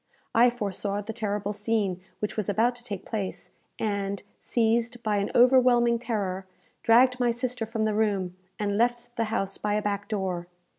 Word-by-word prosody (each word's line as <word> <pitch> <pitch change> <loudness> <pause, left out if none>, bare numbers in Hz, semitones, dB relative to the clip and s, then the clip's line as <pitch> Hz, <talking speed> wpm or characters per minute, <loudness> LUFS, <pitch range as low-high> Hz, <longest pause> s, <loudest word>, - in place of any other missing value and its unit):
I 240 +2 +6
foresaw 205 -3 -2
the 225 +2 -6
terrible 210 -2 -2
scene 205 -3 -1 0.2
which 210 - -2
was 215 -3 -2
about 225 +5 +3
to 245 - -12
take 200 -5 -6
place, 205 -5 -4 0.3
and, 200 -2 -2 0.2
seized 235 +1 0
by 210 -1 +1
an 200 0 0
overwhelming 245 -2 +5
terror, 200 -6 -2 0.3
dragged 250 +2 +5
my 245 -1 +3
sister 240 -1 -2
from 225 -1 -2
the 215 -1 +1
room, 200 -4 0 0.2
and 205 0 -1
left 240 0 0
the 230 - 0
house 195 -3 -2
by 210 0 0
a 210 - +1
back 205 0 -2
door. 185 -5 -2
215 Hz, 170 wpm, -27 LUFS, 200-235 Hz, 0.3 s, I